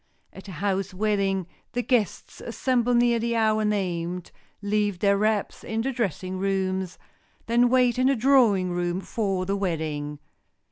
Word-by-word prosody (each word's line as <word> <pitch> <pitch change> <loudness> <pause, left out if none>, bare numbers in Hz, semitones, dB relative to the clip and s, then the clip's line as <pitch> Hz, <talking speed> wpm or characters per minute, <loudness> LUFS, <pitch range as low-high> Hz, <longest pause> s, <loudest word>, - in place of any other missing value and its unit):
At 195 - -12
a 190 - -8
house 195 +2 -2
wedding 195 -2 0 0.3
the 245 - -1
guests 235 -5 -1
assemble 245 -2 0
near 240 -1 +3
the 235 +1 -1
hour 220 -1 +2
named, 180 -4 -2 0.3
leave 205 -1 0
their 200 +2 +3
wraps 210 0 0
in 225 0 -2
the 270 +4 -1
dressing 190 - -3
rooms, 190 -1 -1 0.5
then 240 +1 +3
wait 250 -1 +3
in 255 - +4
the 275 - +3
drawing 225 -8 +3
room 175 0 -1
for 195 -4 -2
the 195 +2 -1
wedding. 155 -6 -3
200 Hz, 150 wpm, -25 LUFS, 185-235 Hz, 0.5 s, in